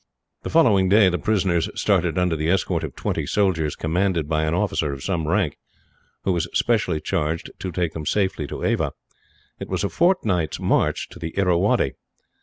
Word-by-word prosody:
The - - -5
following 105 - +4
day 100 -1 +6
the 90 - -2
prisoners 95 -6 +1
started 90 -4 +1
under 90 -2 +1
the 80 +1 -1
escort 95 +2 +1
of - - -6
twenty - - -2
soldiers, 85 -7 +1
commanded 85 -1 0
by 80 0 0
an 80 +2 0
officer 90 -6 0
of 70 -1 -7
some 85 -4 -1
rank, 85 -4 0 0.7
who 95 - +1
was 85 -1 -1
specially 105 -9 +1
charged 80 -1 -2
to 95 - -4
take 85 -2 -1
them 75 -2 -6
safely 95 -7 0
to - - -6
Ava. - - 0 0.7
It - - -7
was - - -1
a 100 - 0
fortnight's 110 - +1
march - - +1
to - - -12
the 80 +2 -6
Irrawaddy. 90 -3 +2
90 Hz, 180 wpm, -23 LUFS, 80-100 Hz, 0.7 s, day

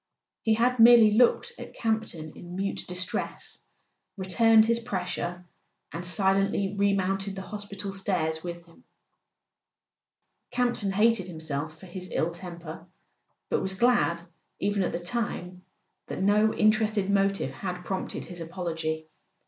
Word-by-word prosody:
He 220 -1 +2
had 245 +2 +2
merely 230 -2 +8
looked 245 - +3
at - - -9
Campton 220 -9 -2
in 175 0 -9
mute 195 +1 -2
distress, 180 +1 -4 0.6
returned 220 +4 +5
his 230 +1 +2
pressure, 180 -5 -4 0.5
and 170 - -5
silently 195 +1 +1
remounted 195 -1 +1
the 190 - -6
hospital 200 -1 -6
stairs 170 -5 -1
with 170 -1 -6
him. 170 +9 -21 1.7
Campton 240 -5 0
hated 210 -1 +3
himself 160 -2 -5
for 190 - -13
his 185 +1 -7
ill 165 - 0
temper, 170 -1 -9 0.6
but - - +2
was 190 0 -1
glad, 235 -7 +2 0.4
even 205 0 0
at 185 - 0
the - - -3
time, 180 -2 -3 0.5
that - - -3
no 210 +2 +4
interested 215 -2 +2
motive 195 -6 +1
had 180 +4 -5
prompted 190 -1 -4
his 175 -2 -9
apology. 165 -2 -3
190 Hz, 130 wpm, -27 LUFS, 175-215 Hz, 1.7 s, merely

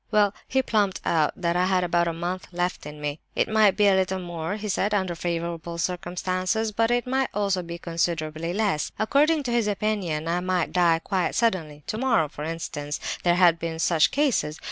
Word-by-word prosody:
"Well, 210 -2 +3
he 265 0 +1
plumped 205 -5 +1
out 155 -3 +2
that 170 -1 0
I 180 +1 +3
had 185 -1 +2
about 175 0 +1
a - - +1
month 175 +3 -4
left 175 -3 -2
me; 150 0 -5 0.2
it - - +2
might 215 -3 +4
be 210 - +4
a 200 - +6
little 190 0 +1
more, 175 0 -4
he 210 0 -5
said, 205 +1 0
under 190 -3 0
favourable 170 0 -3
circumstances, 185 +5 -1
but 225 +2 +1
it 240 0 +1
might 265 +1 0
also 200 -3 +1
be 170 0 -7
considerably 165 -1 -2
less. 195 -6 0
According 290 +7 +2
to 245 - -3
his 235 -3 +1
opinion 200 -7 -1
I 170 +1 +1
might 180 -2 -1
die 170 -2 +3
quite 185 -2 -1
suddenly—tomorrow, 185 - 0
for 150 - -8
instance—there 160 +1 -2
had 175 -2 +5
been 165 -1 -4
such 165 -1 +3
cases. 255 - 0
180 Hz, 185 wpm, -25 LUFS, 165-210 Hz, 0.2 s, a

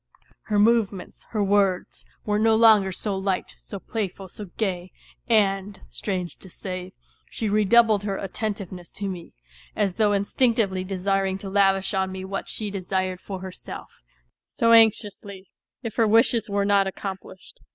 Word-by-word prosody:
Her 210 - 0
movements, 210 -3 +1
her 215 -3 0
words, 195 -2 +1 0.2
were 210 0 +1
no 220 0 +4
longer 220 -4 +6
so 200 +2 -3
light, 190 -1 -2
so 200 - -8
playful, 195 -2 -5
so 210 - -8
gay; 185 -4 -2 0.4
and, 200 -2 +2
strange 185 -4 -4
to 190 - -13
say, 185 0 -7 0.4
she 220 - -3
redoubled 215 +1 +4
her 200 -1 -3
attentiveness 195 -3 -5
to 200 - -4
me, 180 -3 -7 0.4
as 200 -3 +1
though 215 -2 +3
instinctively 200 -2 +1
desiring 195 0 -1
to 195 0 -8
lavish 195 0 +2
on 190 -1 0
me 190 0 -6
what 195 +1 -5
she 210 -2 -4
desired 185 -1 -2
for 190 -2 -6
herself 190 -1 -9 0.5
so 230 0 +1
anxiously, 205 -4 +2 0.3
if 225 -3 -6
her 225 -2 +4
wishes 225 +1 +3
were 200 0 +1
not 200 -1 +3
accomplished. 190 - -8
200 Hz, 150 wpm, -24 LUFS, 190-215 Hz, 0.5 s, longer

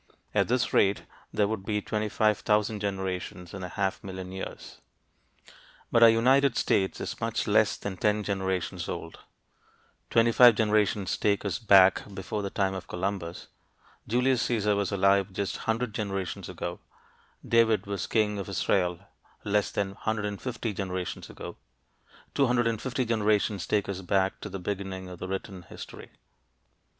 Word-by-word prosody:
At - - +2
this 125 +1 0
rate 100 0 +3 0.3
there 105 - +2
would 105 -2 -3
be 105 +1 -1
25,000 105 0 +1
generations 95 -3 -4
in 100 - -6
a 90 - -5
half 95 +1 -2
million 95 -1 -7
years. 95 0 -8 1.1
But 115 - +4
our 115 - +10
United 130 +3 +4
States 95 -1 +1
is - - -5
much - - -1
less - - +3
than 100 -2 -5
ten 105 +2 +1
generations 95 -3 -2
old, 85 -1 -6 0.9
twenty 115 0 +4
five 120 -1 +8
generations 105 -3 +1
take 100 0 +1
us 95 -4 -1
back 95 -3 +6
before 100 +2 -3
the 100 - -3
time 95 -1 0
of 95 - -6
Columbus, 90 -2 -4 0.6
Julius 125 +2 +2
Caesar 105 -3 +1
was 100 0 -1
alive 100 0 +3
just 100 0 -2
100 115 0 0
generations 95 -4 -3
ago, - - -5 0.7
David 115 -3 +3
was 100 -2 -3
king 105 -2 +1
of 100 - -5
Israel 90 -2 0 0.4
less 105 0 +1
than 100 -1 -1
150 110 +3 -3
generations 95 -2 -4
ago, - - -8 0.8
250 125 -1 +1
generations 105 -4 +1
take 105 -2 +1
us 95 -1 -4
back 95 +1 0
to - - -6
the 95 - -5
beginning 95 0 -4
of 90 -1 -10
written 95 0 -5
history. 85 - -10
100 Hz, 140 wpm, -28 LUFS, 95-110 Hz, 1.1 s, our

